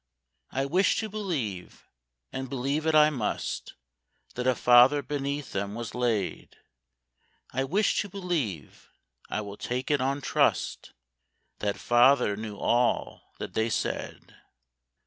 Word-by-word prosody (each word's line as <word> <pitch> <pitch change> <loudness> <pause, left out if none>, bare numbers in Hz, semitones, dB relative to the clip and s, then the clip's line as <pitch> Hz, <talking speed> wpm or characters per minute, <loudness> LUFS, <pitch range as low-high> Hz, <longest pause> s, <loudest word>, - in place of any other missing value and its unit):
I 135 +1 -1
wish 180 +8 +2
to 220 - -4
believe, 150 - -4 0.5
and 135 -1 -4
believe 140 +4 -1
it 160 - +3
I 150 0 +6
must, 120 -8 -3 0.6
That 125 +1 -3
a 130 - +4
father 125 +5 +6
beneath 140 -1 -3
them 100 +1 -3
was 115 0 -5
laid: 115 -6 -2 1.0
I 135 +2 0
wish 195 +10 +1
to 205 - -6
believe,—I 110 - -5
will 100 -1 -8
take 125 +3 -3
it 145 -3 +2
on 135 +2 0
trust, - - 0 0.7
That 100 -1 -1
father 120 -3 +4
knew 105 -1 -6
all 120 +4 0
that - - -6
they 110 +1 +1
said. 110 - -4
130 Hz, 125 wpm, -28 LUFS, 110-145 Hz, 1.0 s, I